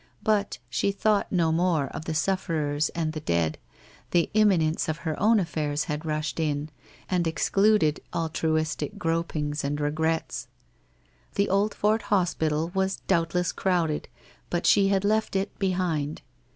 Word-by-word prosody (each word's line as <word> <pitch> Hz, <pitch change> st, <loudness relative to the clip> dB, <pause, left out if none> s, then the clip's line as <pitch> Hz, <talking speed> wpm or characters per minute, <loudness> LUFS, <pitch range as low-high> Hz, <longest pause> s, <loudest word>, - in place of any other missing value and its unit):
But 210 Hz, -2 st, +1 dB
she 200 Hz, -, 0 dB
thought 205 Hz, +1 st, +1 dB
no 170 Hz, -3 st, +2 dB
more 165 Hz, -3 st, +2 dB
of 160 Hz, -, -7 dB
the 160 Hz, -, -3 dB
sufferers 155 Hz, -4 st, 0 dB
and 160 Hz, -2 st, -1 dB
the 155 Hz, -, -4 dB
dead, 85 Hz, -, 0 dB, 0.5 s
the 175 Hz, -1 st, +2 dB
imminence 180 Hz, -8 st, +3 dB
of 155 Hz, -, -1 dB
her 160 Hz, -1 st, 0 dB
own 220 Hz, +2 st, +5 dB
allairs 155 Hz, -4 st, -1 dB
had 150 Hz, +2 st, -4 dB
rushed 155 Hz, -1 st, -2 dB
in, 150 Hz, -1 st, -1 dB, 0.4 s
and 180 Hz, -3 st, +1 dB
excluded 180 Hz, 0 st, +2 dB
altruistic 155 Hz, -2 st, -1 dB
gropings 155 Hz, -3 st, -1 dB
and 145 Hz, +1 st, -1 dB
regrets. 160 Hz, +2 st, -1 dB, 0.9 s
The 200 Hz, -, +2 dB
Oldfort 210 Hz, +2 st, +2 dB
hospital 165 Hz, -5 st, 0 dB
was 190 Hz, 0 st, 0 dB
doubtless 175 Hz, -1 st, +1 dB
crowded, 170 Hz, -5 st, 0 dB, 0.4 s
but 175 Hz, 0 st, -1 dB
she 200 Hz, -1 st, +5 dB
had 195 Hz, 0 st, +1 dB
left 215 Hz, 0 st, +1 dB
it 195 Hz, +1 st, -2 dB
behind. 175 Hz, -6 st, -1 dB
165 Hz, 140 wpm, -26 LUFS, 155-195 Hz, 0.9 s, own